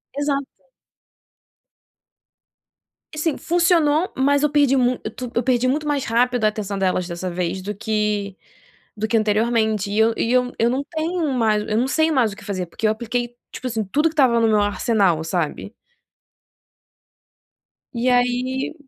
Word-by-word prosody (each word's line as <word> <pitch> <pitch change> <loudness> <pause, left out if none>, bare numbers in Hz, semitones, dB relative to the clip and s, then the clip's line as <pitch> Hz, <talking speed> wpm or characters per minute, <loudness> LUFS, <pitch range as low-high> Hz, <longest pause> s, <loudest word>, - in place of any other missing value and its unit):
Exato. 280 -1 -1 2.7
E - - -9
sim 310 -1 0
funcionou, 335 -1 +2
mas 280 +2 +3
eu 300 - +2
perdi 285 -2 +3
muit 250 -1 +1 0.2
tu 250 -2 -6
eu 240 - +1
perdi 255 0 +1
muito 300 +3 -1
mais 285 -2 0
rápido 245 0 +1
a - - +6
atenção 205 -2 -3
delas 185 -1 0
dessa 175 +1 -4
vez 180 +1 -3
do 205 +2 -5
que 210 -2 -1 0.6
do 215 +1 -1
que 230 - 0
anteriormente. 220 -1 +1
E 210 - 0
eu 225 +1 +4
e 230 - 0
eu 250 0 +2
eu 230 - +3
não 260 +3 -1
tenho 320 -1 -2
mais 220 -4 +2
eu 215 - 0
não 250 +3 +1
sei 315 +3 +2
mais 240 -7 +2
o - - -11
que 205 - -14
fazer, 190 -3 -3
porque 215 +6 -2
eu - - +3
apliquei 240 +2 -3 0.2
tipo 255 - -6
assim, 225 -2 -2
tudo 295 +11 +1
que - - -12
estava 260 -6 +3
no 230 - +3
meu 215 -1 +3
arsenal, 200 -5 +1
sabe? 175 +5 -3 2.2
E 240 +2 +1
aí, 250 +3 0
235 Hz, 170 wpm, -21 LUFS, 210-270 Hz, 2.7 s, a